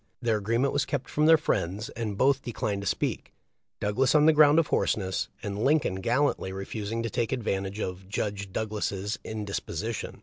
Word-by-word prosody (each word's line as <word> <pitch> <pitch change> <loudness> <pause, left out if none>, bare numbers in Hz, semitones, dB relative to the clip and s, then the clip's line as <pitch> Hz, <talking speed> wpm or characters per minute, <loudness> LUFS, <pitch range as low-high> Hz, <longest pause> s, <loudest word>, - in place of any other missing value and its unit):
Their 115 -3 +1
agree 110 +3 0
ment 135 +3 +1
was 145 - +2
kept 140 -1 -3
from 150 +1 +2
their 160 0 +8
friends, 105 - -1
and 110 -4 -4
both 135 +2 +3
declined 105 -5 -3
to 100 - -4
speak - - -2 0.2
— - - -56
Douglas, 125 +7 +2
on 150 0 +6
the 160 - +7
ground 150 0 +6
of 165 - +5
hoarseness, 95 -9 0 0.2
and 105 +1 -3
Lincoln 135 -10 +2
gallantly 120 -3 +1
refusing 105 +4 -4
to 115 - -2
take 120 -2 -1
advantage 100 -5 -2
of 95 -1 -5
"Judge 100 -2 -3
Douglas's 105 +1 -2
indisposition." 105 0 -4
110 Hz, 180 wpm, -28 LUFS, 100-135 Hz, 0.2 s, their